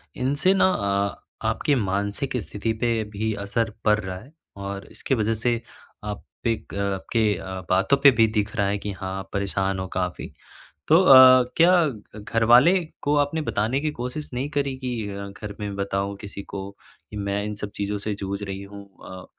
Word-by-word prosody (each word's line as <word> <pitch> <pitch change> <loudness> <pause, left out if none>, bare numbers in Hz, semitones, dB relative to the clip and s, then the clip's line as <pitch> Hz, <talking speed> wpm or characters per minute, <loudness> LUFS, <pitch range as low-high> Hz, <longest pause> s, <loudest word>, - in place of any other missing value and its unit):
इनसे 145 +9 +2
ना 190 -1 +4
अ, 100 - -1 0.3
आपके 145 - +1
मानसिक 100 +4 -2
स्थिति 110 +3 -3
पे 115 -2 +1
भी 105 +1 -3
असर 115 +2 0 0.2
पड़ 105 0 +4
रहा 95 -2 -5
है, 135 +10 -14 0.2
और 100 0 -6
इसके 135 - -1
वज़ह 110 -1 +1
से 115 +1 0 0.4
आप 105 -1 -5 0.2
एक 115 -3 -2
अ, - - -5 0.2
आपके 110 +2 0
अ, 95 0 -6
बातों 95 +9 +3
पे 140 - +10
भी 115 -2 +4
दिख 105 -1 -2
रहा 100 -2 +1
है 100 - 0
कि 100 0 -5
हाँ, 95 0 -5
आप 95 0 -9
परेशान 95 -1 -1
हो 95 - -3
काफ़ी। 90 -1 -3 0.6
तो 160 +3 +7
अ, 130 -5 +9
क्या 175 0 +5
घ 110 -4 -8
घर 115 +2 -1
वाले 125 +10 +7 0.3
को 145 - +1
आपने 145 +2 +1
बताने 115 +3 0
की 155 - -1
कोशिश 125 +5 -4
नहीं 135 +4 -2
करी 140 -2 -1
कि 120 -5 -3
अ, 100 0 -6
घर 100 +1 -8
में 100 -1 -4
बताऊँ 100 0 -2
किसी 100 -1 -7
को 100 0 -7 0.4
कि 105 - -9
मैं 100 0 -2
इन 105 0 -4
सब 105 -1 -5
चीज़ों 105 0 -2
से 105 +1 -3
जूझ 100 0 -5
रही 100 -1 -5
हूँ 100 0 -10 0.2
अ, 95 0 -9
105 Hz, 195 wpm, -24 LUFS, 100-125 Hz, 0.6 s, पे